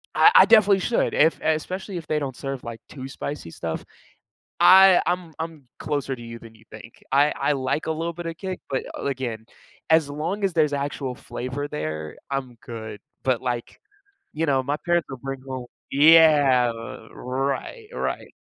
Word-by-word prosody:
I 425 - +7
I - - +9
definitely 205 -3 +6
should 230 +5 0
if 160 +2 +3
especially 180 +5 -2
if 165 - -8
they 155 -1 0
don't 135 -3 -4
serve, 135 -2 -5
like, 115 -1 -7
too 130 -2 -8
spicy 140 - -6
stuff. 80 -1 -5 0.8
I 190 -1 +8
I'm 175 -2 -2
I'm 160 -5 -6
closer 140 -3 -2
to 120 - -13
you 115 0 -8
than 115 -1 -14
you 110 - -20
think, 110 +2 -13
I 145 +2 +4
I - - +2
like 135 +3 -1
a 160 - +1
little 165 +2 -3
bit 175 +1 -8
of 165 - -5
kick, 185 -1 -5
but 135 -1 -1
a - - -6
again, 125 -5 -3 0.5
as 160 -3 +4
long 170 +8 -3
as 190 -3 +1
there's 150 -3 +2
actual 140 -2 -3
flavor 130 +4 -5
there, 80 - -5 0.2
I'm 130 -3 -3
good. 110 -3 -7 0.2
But 130 -3 +1
like, 120 -2 -4 0.5
you 165 +2 -1
know, 135 -3 +2
my 145 +2 -1
parents 175 -1 +1
will 135 - -6
bring 135 -1 -5
home 130 -2 -5 0.3
yeah, 145 -5 +6 0.4
right, 135 - -3
right. - - -3
140 Hz, 180 wpm, -24 LUFS, 125-165 Hz, 0.8 s, I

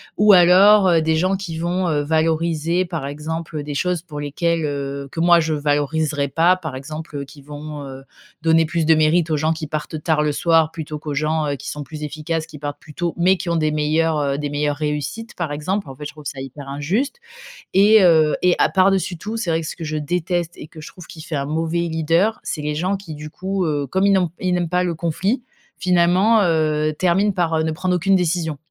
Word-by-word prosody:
ou, 210 0 +5
alors, 190 +3 +7
heu, 165 -2 +4
des 160 0 +1
gens 185 +3 +1
qui 175 -4 -5
vont, 175 +1 -1
heu, 150 -1 +1
valoriser, 160 +2 0
par 165 -5 -4
exemple, 155 +2 -5
heu, 145 - -3
des 145 -1 -5
choses 180 +2 0
pour 150 -4 -7
lesquelles, 165 +3 -1
heu, 140 -1 -4
que, - - -6
moi, 170 0 +5
je 155 0 -1
valoriserais 145 0 0
pas. 170 +5 +3
Par 160 -7 -6
exemple, 155 +3 -8
heu, 140 - -4
qui 140 +1 -15
vont, 150 +1 -8
heu, 135 0 -9 0.4
donner 165 0 +4
plus 165 0 -1
de 160 0 +5
mérite 160 +1 +2
aux 155 - +2
gens 155 +2 +1
qui 160 -2 -4
partent 155 0 -5
tard 155 -2 +1
le 150 - +1
soir 160 +1 +2
plutôt 155 -1 -6
qu'aux 150 -1 -5
gens, 155 +2 0
heu, 140 - -3
qui - - -10
sont 150 0 -5
plus 150 +1 -8
efficaces, 155 +2 -3
qui 150 -2 -11
partent 145 0 -6
plus 150 - -14
tôt, 170 +1 -2
mais 185 +2 +4
qui 180 -1 -5
ont 170 - +1
des 155 -1 +1
meilleurs, 155 +1 +1
heu, 140 -1 0
des 145 -1 -3
meilleures 145 0 -1
réussites, 150 +9 -4
par 165 -4 -3
exemple. 185 +4 -2
En 135 - -9
fait, 150 - -9
je 150 - -5
trouve 150 -1 -14
ça 135 - -6
hyper 135 +1 -8
injuste 175 - -1 0.6
et 210 +2 +6
heu, 160 -4 +5
et 180 -1 +4
à - - +4
par 190 0 +4
dessus 190 -2 -1
tout, 215 +6 -5
c'est 185 -7 -1
vrai 165 0 +1
que 160 - -6
ce - - -5
que 170 - -8
je 155 0 -3
déteste 175 +2 -2
et - - -8
que 155 0 -12
je - - -9
trouve 180 -4 -12
qui 160 - -11
fait 155 - -5
un 140 0 -1
mauvais 165 +3 -1
leader, 165 +6 +1
c'est 150 - -4
les 150 0 -1
gens 185 +5 -1
qui, 180 -5 -9
du 150 +1 -8
coup, 190 +2 -3
heu, 145 -2 -1
comme 190 +7 +1
ils - - +4
n'ont 180 -4 +2
ils 185 -1 -1
n'aiment 175 -1 0
pas 180 +1 +1
le 170 -2 -1
conflit, 185 - -1 0.3
finalement, 180 +5 +3
heu, 155 -2 +1
terminent 185 +4 +2
par, 175 -3 0
heu, 160 - +1
ne 160 - -1
prendre 180 +3 -1
aucune 190 +3 +2
décision, 165 -4 0
160 Hz, 240 wpm, -20 LUFS, 150-175 Hz, 0.6 s, alors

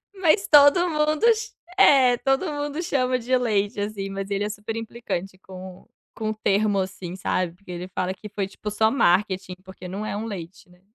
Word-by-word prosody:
Mas 385 +2 +2
todo 295 +4 +6
mundo 305 +3 +1
ch 440 0 -6 0.2
é, 265 -9 +6
todo 270 +7 0
mundo 290 +2 -3
chama 255 -6 0
de 250 +2 0
leite, 210 -3 0
assim, 205 -1 -4
mas 195 0 -5
ele 200 0 -1
é - - -3
super 210 +1 -6
implicante 215 -5 -5
com 185 -1 -11 0.3
com 215 -1 -3
o 220 - -1
termo, 205 -1 +1
assim, 185 -2 -5
sabe, 185 -2 -1
porque 185 +1 -23
ele 180 +1 -6
fala 185 0 -2
que 210 +3 -11
foi 200 -1 -3
tipo 210 +2 -7
só 220 +1 +3
marketing, 190 -4 +1
porque 190 -1 -12
não 195 +4 -5
é 205 - -3
um 210 - -3
leite, 180 -4 -8
né. 180 0 -22
210 Hz, 195 wpm, -24 LUFS, 190-255 Hz, 0.3 s, todo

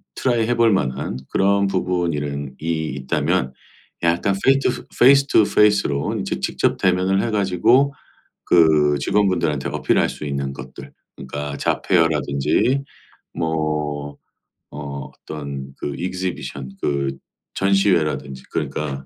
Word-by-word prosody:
트라이 120 -4 +1
해 120 - +1
볼 115 -1 +4
만한 65 -6 -1
그런 100 0 +2
부분 90 -3 0
이런 70 -2 -4
이 80 -3 -2
있다면 65 -1 0 0.5
약간 85 +4 +2
페이 135 0 +5
투 135 - +1 0.3
페이스 140 +2 +6
투 110 - +5
페이스로 100 -10 +2
이제 65 - -3
직접 - - 0
대면을 95 +1 +2
해가지고 115 +6 +2 0.5
그 75 -4 +4
직원분들한테 85 -7 +1
어필할 - - +1
수 - - -8
있는 70 -1 -3
것들 65 0 -10 0.2
그러니까 70 +2 -5
잡 - - -1
페어라든지 80 - +1 0.5
뭐 75 -3 -2 0.5
어 70 -2 -6
어떤 70 -3 -6
그 70 - -4
exhibition 85 -7 -4
그 70 -2 -1 0.4
전시회라든지 85 -9 +1
그러니까 70 -3 -3
80 Hz, 290 characters per minute, -21 LUFS, 70-95 Hz, 0.5 s, 페이스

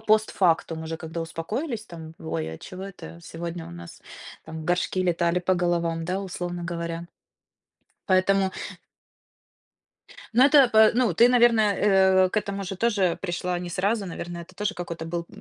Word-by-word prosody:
постфактум, 180 -6 +1
уже 165 0 -4
когда 160 +1 -6
успокоились 215 - -4
там: 160 -3 -10
"Вой, 80 0 -4
а - - -11
чего 185 +1 -9
это 190 -3 -10
сегодня 170 0 -6
у - - -10
нас 85 0 -11 0.4
там 160 0 -7
горшки 180 +2 0
летали 175 -1 +1
по 185 +1 +1
головам?" 170 -2 0
Да, 185 +3 -2
условно 175 -2 -5
говоря. 170 0 -4 1.0
Поэтому 190 0 +3 1.8
Ну 245 +3 +5
это 280 -2 +7
пэ 220 -2 +6
Ну 240 -7 +2
ты, 235 +8 +6
наверно, 240 -2 +5
э, 190 -2 +4
к - - -6
этому 200 -1 -2
же 195 +1 -5
тоже 200 -5 +1
пришла 180 -1 -2
не 175 0 -6
сразу, 200 +4 0
наверно, 175 0 -6
это 170 +2 -11
тоже 210 +2 -2
какой-то 170 -2 -6
был 170 +1 -4
180 Hz, 155 wpm, -25 LUFS, 170-200 Hz, 1.8 s, это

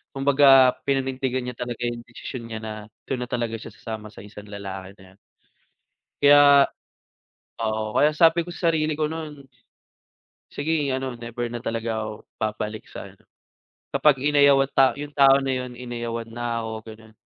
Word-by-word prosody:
kumbaga 135 -2 +6 0.2
pinanindigan 130 -1 -1
niya 125 -1 -5
talaga 120 -1 -5
'yung 120 0 -5
desisyon 120 0 -8
niya 110 -1 -5
na 110 - -5 0.4
do'n 130 -2 -2
na - - -21
talaga 120 -2 -2
siya - - -10
sasama 110 -2 -7
sa - - -11
isang 105 0 -12
lalaki 95 -1 -8
na 95 - -15
'yon. - - -27 1.0
Kay, 145 - +6 1.3
oo 110 -1 -2
kaya 150 - +5
sabi 165 +1 +5
ko 175 - -8
sa 170 -1 0
sarili 155 -1 0
ko 155 - +1
nun, 150 -3 -6 1.1
Sige, 145 -2 -1
ano 130 -1 -3
never 120 0 -5
na 120 0 -7
talaga 115 -1 -2
ako 110 0 -8
babalik 105 0 -4
sa - - -8
ano, - - -19 0.7
kapag 145 -3 +4
inayawan 140 -1 +4
ta 135 -1 +5
'yung 145 0 -7
tao 135 -1 +6
na 135 - -4
'yun 125 -1 -3
inayawan 120 -2 -5
na 120 0 -3
ako 110 - -5 0.2
gano'n, 110 0 -15
125 Hz, 165 wpm, -24 LUFS, 115-140 Hz, 1.3 s, kumbaga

